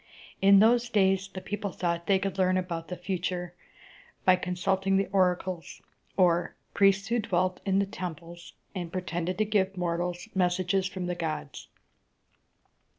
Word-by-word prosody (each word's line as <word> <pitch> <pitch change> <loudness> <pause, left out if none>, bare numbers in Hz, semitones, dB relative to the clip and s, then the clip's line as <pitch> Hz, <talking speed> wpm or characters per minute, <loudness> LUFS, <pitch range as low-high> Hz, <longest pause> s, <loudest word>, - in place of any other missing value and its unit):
In 195 0 +7
those 235 +3 +4
days 195 -3 +2
the 185 - -7
people 205 0 -4
thought 170 -1 -2
they 195 - +4
could 195 0 -3
learn 185 0 +3
about 170 -3 -3
the 180 - -5
future 180 -1 -3 0.7
by 185 - +7
consulting 190 +2 0
the 195 - +2
oracles, 185 -2 0 0.4
or 175 -2 +3 0.2
priests 195 +1 +3
who 240 +1 +2
dwelt 185 -3 0
in 195 0 +3
the 200 - +3
temples, 175 -3 -8 0.2
and 175 -4 -5
pretended 180 -1 -3
to 215 - +2
give 195 -2 0
mortals 175 +2 -2
messages 185 +1 +1
from 185 -2 -5
the 180 - -1
gods. 155 -5 -5
185 Hz, 150 wpm, -28 LUFS, 175-195 Hz, 0.7 s, In